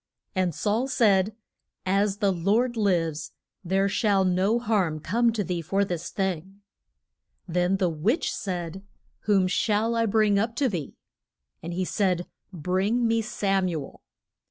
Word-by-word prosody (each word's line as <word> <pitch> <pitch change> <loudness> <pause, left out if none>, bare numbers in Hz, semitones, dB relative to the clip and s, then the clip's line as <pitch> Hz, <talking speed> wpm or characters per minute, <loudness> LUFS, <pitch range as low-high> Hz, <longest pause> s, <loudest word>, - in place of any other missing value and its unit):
And 185 -5 0
Saul 225 +5 0
said, 210 -5 +3 0.5
As 195 +1 +1
the 200 -2 +2
Lord 210 +8 +1
lives 165 -8 0 0.3
there 195 +2 +1
shall 200 -1 +2
no 185 +5 +2
harm 205 -9 0
come 230 +9 +2
to 215 -2 -1
thee 180 -2 -2
for 195 +5 0
this 175 -3 -4
thing. 190 0 -3 0.9
Then 180 +2 +1
the 190 -2 +1
witch 175 - 0
said, 180 -2 -4 0.5
Whom 195 -3 +4
shall 220 +3 +1
I 230 0 +2
bring 210 -1 +3
up 225 +2 -1
to 275 +2 +2
thee? 175 - -4 0.6
And 170 - -6
he 185 +2 -1
said, 180 -2 0 0.3
Bring 190 +8 0
me 225 0 +2
Sam 195 -3 0
u 165 -3 -2
el. - - -14
195 Hz, 150 wpm, -26 LUFS, 180-215 Hz, 0.9 s, Whom